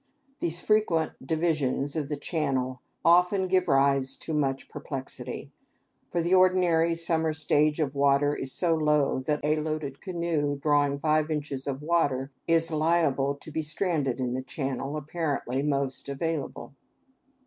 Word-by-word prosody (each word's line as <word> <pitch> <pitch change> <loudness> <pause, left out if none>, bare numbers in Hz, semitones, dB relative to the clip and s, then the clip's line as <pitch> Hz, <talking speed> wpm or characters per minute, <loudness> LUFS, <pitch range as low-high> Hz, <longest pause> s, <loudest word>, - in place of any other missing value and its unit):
These 170 +1 +1
frequent 195 -7 +2
divisions 150 -2 0
of 150 -3 -2
the 150 - -2
channel 130 -5 -2 0.2
often 180 +3 +4
give 185 0 +2
rise 135 -2 +2
to 160 - -6
much 135 -3 -1
perplexity; 135 -2 -6 0.6
for 170 - -1
the 175 +2 +1
ordinary 180 -3 +4
summer 165 -1 +1
stage 150 0 +1
of 145 -3 0
water 140 +1 +3
is 135 - -4
so 170 +2 +2
low 150 -4 +2
that 150 +3 -1
a 155 +1 +2
loaded 155 -3 -3
canoe 170 -6 -1
drawing 145 -1 +2
five 155 +1 +1
inches 145 -3 -3
of 140 +1 -3
water 145 -5 +1 0.2
is 165 0 +3
liable 155 -3 +1
to 145 - -12
be 160 - -1
stranded 155 -5 -1
in 125 -1 -1
the 130 - -2
channel 135 +2 -4
apparently 145 -4 -2
most 140 -2 -1
available. 145 0 -4
150 Hz, 145 wpm, -27 LUFS, 140-165 Hz, 0.6 s, often